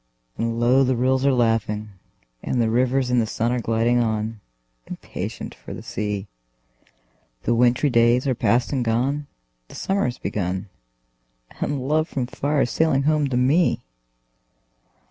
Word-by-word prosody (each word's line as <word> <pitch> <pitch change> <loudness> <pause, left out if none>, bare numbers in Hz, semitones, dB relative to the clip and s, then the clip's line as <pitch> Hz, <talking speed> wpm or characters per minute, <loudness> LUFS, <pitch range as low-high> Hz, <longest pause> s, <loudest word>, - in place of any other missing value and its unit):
And 115 0 -2
low 125 +3 +4
the 130 0 +1
rills 130 +2 +2
are - - +5
laughing, 115 -3 0 0.5
and 125 - -1
the 115 -1 +2
rivers 125 +1 +1
in 125 - +3
the 110 - +1
sun 115 +2 -1
Are 125 - 0
gliding 115 +1 +1
on, 110 -1 -1 0.5
impatient - - -6
for - - -9
the - - -9
sea; 105 -1 -3 1.2
The 120 - +1
wintry 125 +4 +3
days 120 +2 +4
are 130 - +2
past 120 +2 +1
and 130 -3 0
gone, 130 +6 0 0.4
the - - -13
summer 195 +1 0
is 125 - -4
begun, 95 0 -3 0.9
And 135 -3 -2
love 155 +2 +1
from 130 -3 -2
far 145 +3 -1
is - - -3
sailing 150 -4 +2
home 150 0 +2
to 125 - 0
me! 130 0 +2
125 Hz, 155 wpm, -23 LUFS, 115-135 Hz, 1.2 s, are